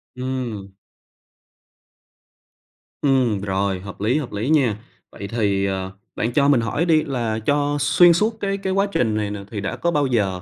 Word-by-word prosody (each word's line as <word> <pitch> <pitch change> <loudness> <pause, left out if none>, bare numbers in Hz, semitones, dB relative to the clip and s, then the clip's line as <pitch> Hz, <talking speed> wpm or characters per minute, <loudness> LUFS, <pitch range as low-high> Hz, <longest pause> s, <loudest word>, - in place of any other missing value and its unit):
Ừm. 125 -6 -4 2.3
Ừm, 130 -7 +2
rồi, 95 -1 -1
hợp 100 +1 -10
lý, 115 +7 +2
hợp 145 -5 -4
lý 105 +6 -2
nha. 135 -9 +3 0.4
Vậy 100 - -7
thì, 100 -3 0
ờ, 95 -1 -3 0.2
bạn 115 - -1
cho 140 +1 +3
mình 140 -4 +4
hỏi 130 +9 -1
đi 160 -3 +3
là 120 -6 -2
cho 145 0 +1
xuyên 170 +5 +6
suốt 215 +6 0
cái 195 -1 -1
cái 190 -1 -2
quá 195 +1 +2
trình 115 - +1
này 105 -1 -2
nè 105 - -5
thì 105 -3 -4
đã 100 - -3
có 170 - -1
bao 145 -3 +1
giờ 100 -7 0
120 Hz, 180 wpm, -21 LUFS, 100-145 Hz, 2.3 s, xuyên